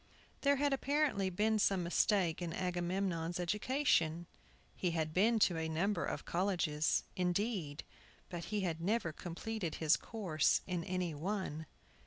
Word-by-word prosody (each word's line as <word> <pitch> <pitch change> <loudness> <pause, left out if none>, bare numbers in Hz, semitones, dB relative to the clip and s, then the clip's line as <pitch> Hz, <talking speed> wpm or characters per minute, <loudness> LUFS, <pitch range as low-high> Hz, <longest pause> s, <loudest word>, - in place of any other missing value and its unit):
THERE 280 0 +4
had 285 0 +1
apparently 275 -8 +1
been 215 +4 +1
some 195 -3 +2
mistake 175 0 +2
in 170 -2 -3
Agamemnon's 175 -1 -1
education. 175 - +1 0.5
He 180 - 0
had 155 -1 -1
been 220 +6 +4
to 180 -5 +3
a 160 0 -2
number 175 +4 0
of - - -4
colleges, 170 -5 +1
indeed, 180 -4 -1 0.4
but 170 -2 -6
he 210 -1 -1
had 165 -3 -2
never 190 -3 0
completed 175 +2 -4
his 160 -1 +3
course 185 -10 +1
in 180 -3 -2
any 180 -2 -2
one. 160 -2 -3
180 Hz, 140 wpm, -35 LUFS, 165-210 Hz, 0.5 s, THERE